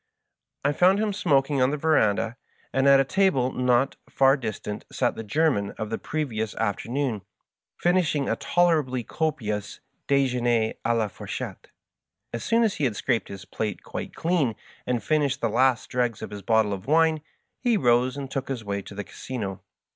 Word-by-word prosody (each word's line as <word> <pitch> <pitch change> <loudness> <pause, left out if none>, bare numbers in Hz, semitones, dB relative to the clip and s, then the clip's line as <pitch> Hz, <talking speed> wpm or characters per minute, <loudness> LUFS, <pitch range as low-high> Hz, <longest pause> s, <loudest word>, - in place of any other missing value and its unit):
I 145 - +4
found 180 +6 +4
him 210 -1 0
smoking 145 -7 +2
in 130 0 +4
the 150 - -1
veranda, 115 -7 +2 0.4
and 135 +1 +3
at 140 0 +7
a - - +5
table 135 -6 +2
not 125 +1 +1
far 135 0 +4
distant 105 -5 -5
sat - - +1
the - - -5
German 120 -4 +1
of 110 -1 -4
the 115 - -2
previous 115 -9 -3
aft 100 -3 -1
ernoon, 125 -4 -1 0.6
finishing 175 -6 +1
a - - +1
tolerably 155 -8 +1
copious 110 -8 -3 0.3
dejeikier 120 -5 +2
d - - -11 0.2
la 115 -2 +1
four - - -11
chette. - - -5 0.7
Ab 115 - -3
soon 230 0 +2
as 220 -4 +1
he 150 - +1
had 115 -5 0
scraped 120 +2 0
his 95 -1 -9
plate 105 -3 -4
quite - - -6
clean 160 -9 +1 0.3
and 125 -2 0
finished 145 -3 +1
the 115 - 0
last 125 +2 +2
dregs 120 -4 -1
of - - -6
his 105 -1 -7
bottle 110 0 +2
of 95 +3 -7
wine, 160 0 +3 0.4
he 240 -3 +2
rose 125 -2 +2
and 140 -1 -6
took 135 -1 -3
his 125 -4 -3
way 100 -1 -3
to 100 - -11
the 105 - -4
Casino. 100 -4 -6
130 Hz, 180 wpm, -25 LUFS, 110-150 Hz, 0.7 s, at